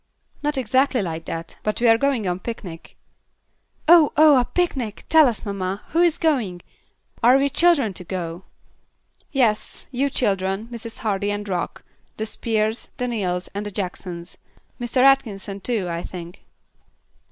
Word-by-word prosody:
"Not 295 Hz, -1 st, -1 dB
exactly 260 Hz, 0 st, +2 dB
like 165 Hz, -2 st, -5 dB
that; 165 Hz, 0 st, -6 dB
but 215 Hz, -, -2 dB
we 240 Hz, -, +3 dB
are 225 Hz, -, +7 dB
going 245 Hz, -4 st, 0 dB
on 180 Hz, 0 st, 0 dB
a -, -, -15 dB
picnic." 185 Hz, -7 st, -8 dB, 0.9 s
"Oh! 330 Hz, -2 st, +7 dB
oh! 305 Hz, -1 st, +7 dB
a 245 Hz, -, +1 dB
picnic! 265 Hz, -, -2 dB
Tell 315 Hz, -3 st, +7 dB
us, 230 Hz, -2 st, -3 dB
mamma. 195 Hz, -1 st, -3 dB
Who 330 Hz, -, 0 dB
is 345 Hz, -3 st, +3 dB
going? 235 Hz, -, 0 dB, 0.6 s
Are 245 Hz, +3 st, +6 dB
we 280 Hz, +1 st, +1 dB
children 310 Hz, -, +3 dB
to 180 Hz, -, -8 dB
go?" 175 Hz, -1 st, -5 dB, 0.9 s
"Yes. 235 Hz, -6 st, 0 dB
You 275 Hz, +2 st, 0 dB
children, 195 Hz, -4 st, 0 dB
Mrs. 230 Hz, -1 st, -8 dB
Hardy 205 Hz, -1 st, 0 dB
and 205 Hz, 0 st, -3 dB
Rock, 180 Hz, -3 st, -3 dB, 0.3 s
the 220 Hz, -, -2 dB
Spears, 220 Hz, 0 st, -1 dB
the 250 Hz, -, -1 dB
Neals, 185 Hz, -6 st, -2 dB
and 200 Hz, +1 st, -3 dB
the 205 Hz, -, -5 dB
Jacksons. 180 Hz, -3 st, -6 dB, 0.4 s
Mr. 240 Hz, +1 st, +1 dB
Atkinson, 215 Hz, -8 st, +2 dB
too, 220 Hz, -6 st, -1 dB
I 170 Hz, 0 st, -3 dB
think." 175 Hz, -1 st, -9 dB
215 Hz, 155 wpm, -22 LUFS, 190-265 Hz, 0.9 s, are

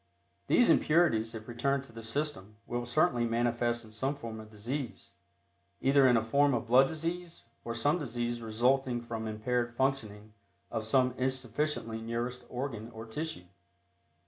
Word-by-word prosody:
These 245 Hz, -, +5 dB
impurities 115 Hz, -9 st, +3 dB
if 110 Hz, 0 st, -8 dB
returned 135 Hz, +3 st, 0 dB
to 135 Hz, -, -14 dB
the 115 Hz, 0 st, -9 dB
system 115 Hz, -4 st, -3 dB
will 120 Hz, 0 st, -3 dB
certainly 120 Hz, -2 st, +2 dB
manifest 120 Hz, 0 st, 0 dB
in 110 Hz, -, -14 dB
some 130 Hz, +6 st, -1 dB
form 115 Hz, -5 st, -7 dB
of 110 Hz, 0 st, -10 dB
disease, 120 Hz, +4 st, -5 dB, 0.7 s
either 135 Hz, +1 st, +5 dB
in 120 Hz, -2 st, +5 dB
a 110 Hz, -, +1 dB
form 140 Hz, +4 st, +3 dB
of 120 Hz, -, -2 dB
blood 130 Hz, +3 st, +6 dB
disease 165 Hz, +2 st, -4 dB, 0.2 s
or 115 Hz, 0 st, -4 dB
some 145 Hz, +9 st, +2 dB
disease 120 Hz, -3 st, -2 dB
resulting 120 Hz, +3 st, +1 dB
from 115 Hz, -1 st, -5 dB
impaired 120 Hz, +2 st, -1 dB
functioning 110 Hz, -6 st, -1 dB, 0.4 s
of 110 Hz, -2 st, -2 dB
some 125 Hz, +2 st, +3 dB
insufficiently 130 Hz, -2 st, -1 dB
nourished 120 Hz, +2 st, -3 dB
organ 120 Hz, -3 st, -4 dB
or 110 Hz, -1 st, -9 dB
tissue. 150 Hz, -, -4 dB
120 Hz, 150 wpm, -31 LUFS, 115-135 Hz, 0.7 s, blood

